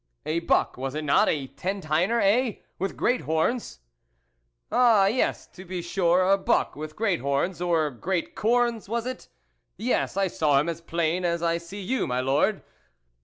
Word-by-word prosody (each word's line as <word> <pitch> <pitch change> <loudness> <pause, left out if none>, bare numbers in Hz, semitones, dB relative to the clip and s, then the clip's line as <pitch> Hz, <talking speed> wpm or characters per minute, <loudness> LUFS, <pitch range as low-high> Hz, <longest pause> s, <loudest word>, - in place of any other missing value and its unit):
" - - -49
A 160 +2 0
buck, 170 - +1
was 135 +2 -4
it 155 - -3
not? 140 - +3
a 145 -3 -1
ten 190 +8 -4
tiner, 180 +8 +1
eh? 225 +4 +3 0.3
with 195 +1 -3
great 250 +1 +1
horns. 160 - -1 0.4
" - - -48
Ah, 230 -5 +5
yes 225 +6 0
to 185 - -12
be 180 -1 -5
sure, 175 0 +2
a 195 +1 +4
buck, 235 - +1
with 155 +1 -7
great 205 - 0
horns, 140 +7 -1
or 165 -4 +1
great 170 +8 -3
corns, 235 -1 +1
was 230 +1 -2
it? 255 0 -6 0.5
yes, 230 -4 -1
I 195 - +3
saw 150 -6 +2
him 150 - -1
as 165 0 -5
plain 170 +1 -1
as 170 -1 0
I 170 0 +1
see 190 +4 -9
you, 250 +7 -1
my 125 0 -1
Lord. 140 +11 +1
175 Hz, 185 wpm, -26 LUFS, 155-205 Hz, 0.5 s, Ah